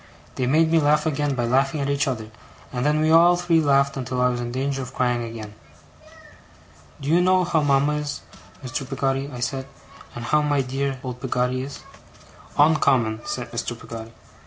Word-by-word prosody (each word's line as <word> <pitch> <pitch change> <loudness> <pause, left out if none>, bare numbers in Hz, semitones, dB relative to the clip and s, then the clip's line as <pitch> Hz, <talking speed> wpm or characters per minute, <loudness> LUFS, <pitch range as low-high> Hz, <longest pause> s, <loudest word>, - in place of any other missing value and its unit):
They 125 - -1
made 160 +4 +3
me 165 - +5
laugh 150 +1 +3
again 145 -2 0
by 120 -2 -1
laughing 135 +5 +1
at 140 - -1
each 140 +1 +1
other, 110 -5 -4 0.4
and 125 -1 -2
then 150 +2 +2
we 155 0 +3
all 170 +2 +6
three 175 -2 +2
laughed 140 -1 +3
until 130 -1 -3
I 125 0 +4
was 120 -1 -2
in 120 0 -4
danger 135 +2 -2
of 125 - -8
crying 125 -1 +1
again. 115 -2 -7 1.5
'Do 140 - -4
you 170 +3 +4
know 185 0 +4
how 170 -3 +1
mama 145 +1 +2
is, 145 -1 -4 0.4
Mr. 130 +1 -3
Peggotty?' 135 0 -1
I 125 -2 -7
said. 130 +2 -3 0.5
'And 120 0 -6
how 150 +4 +3
my 145 -2 +1
dear, 135 +1 -2
dear, 130 - -11
old 125 -1 -6
Peggotty 125 0 0
is?' 140 +1 -7 0.8
'Oncommon,' 135 -7 +3
said 120 -2 -4
Mr. 120 0 -4
Peggotty. 115 -1 -8
135 Hz, 190 wpm, -23 LUFS, 125-150 Hz, 1.5 s, all